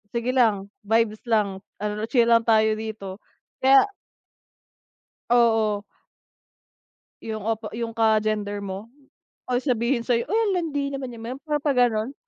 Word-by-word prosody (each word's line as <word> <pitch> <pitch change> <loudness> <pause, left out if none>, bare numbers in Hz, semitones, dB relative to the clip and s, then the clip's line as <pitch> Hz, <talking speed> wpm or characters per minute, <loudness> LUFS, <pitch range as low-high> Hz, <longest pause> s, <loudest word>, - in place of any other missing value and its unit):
sige 235 +2 0
lang 210 -6 +2
vibes 220 0 +1
lang 205 -4 +1 0.2
ano, 210 +1 -3
chill 240 0 +3
lang 230 0 +4
tayo 220 -1 +4
dito 210 -3 -6 0.4
kaya 270 +4 +6 1.5
Oo. 225 -4 +3 1.4
Yung 220 -2 -5
opo 225 -1 -2
yung 230 0 -5
ka-gender 215 -2 +1
mo 200 +3 -7 0.6
ay 250 - +2
sabihin 240 -2 0
sa'yo, 235 -1 +1
"Ay 435 - +1
ang 405 - +1
landi 290 -5 -2
naman 270 -2 -5
'yan," 225 -1 -9
yung 275 - -14
para 300 -1 0
pag 285 -1 0
gano'n. 240 0 +2
225 Hz, 135 wpm, -24 LUFS, 215-250 Hz, 1.5 s, kaya